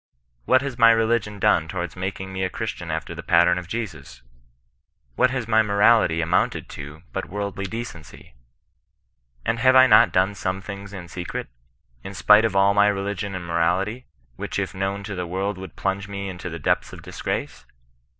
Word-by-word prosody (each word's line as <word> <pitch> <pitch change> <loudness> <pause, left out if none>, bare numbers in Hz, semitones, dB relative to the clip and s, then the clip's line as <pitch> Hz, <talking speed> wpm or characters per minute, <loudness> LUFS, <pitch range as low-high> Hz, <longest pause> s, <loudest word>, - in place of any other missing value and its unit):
What 130 +1 +4
has 135 -4 -5
my 115 0 +8
religion 115 -2 +1
done 100 -6 +2
towards 85 -2 -5
making 95 +1 -5
me 95 0 -2
a 95 - 0
Chris 110 +3 -3
tian 85 -3 -9
after 80 +1 -3
the 85 - -7
pattern 85 +1 +3
of 90 - -9
Jesus? 80 - -6 0.9
What 125 - +3
has 125 -3 -3
my 110 -1 +4
morality 100 -4 +3
amounted 85 +3 0
to 75 +3 -9
but - - -4
worldly 100 0 -4
decency? 90 - -8 1.1
And 115 - 0
have 130 +2 +5
I 130 0 +9
not 130 - +6
done 95 +2 +2
some 95 -1 -3
things 100 0 -8
in 95 -4 -8
secret, 90 -5 -6 0.5
in 95 - -8
spite 105 +3 +6
of 105 -3 -1
all 100 +1 +4
my 100 0 +5
religion 100 0 -2
and 90 -2 -5
morality, 90 +8 0 0.3
which - - -4
if - - -2
known 95 +1 -3
to 105 0 -6
the 90 -2 -4
world 95 +2 -3
would 95 -4 -9
plunge 95 0 -2
me 100 -1 -5
into 90 -1 -6
the 85 - -6
depths 75 - 0
of - - -11
disgrace - - -5
95 Hz, 185 wpm, -23 LUFS, 90-105 Hz, 1.1 s, I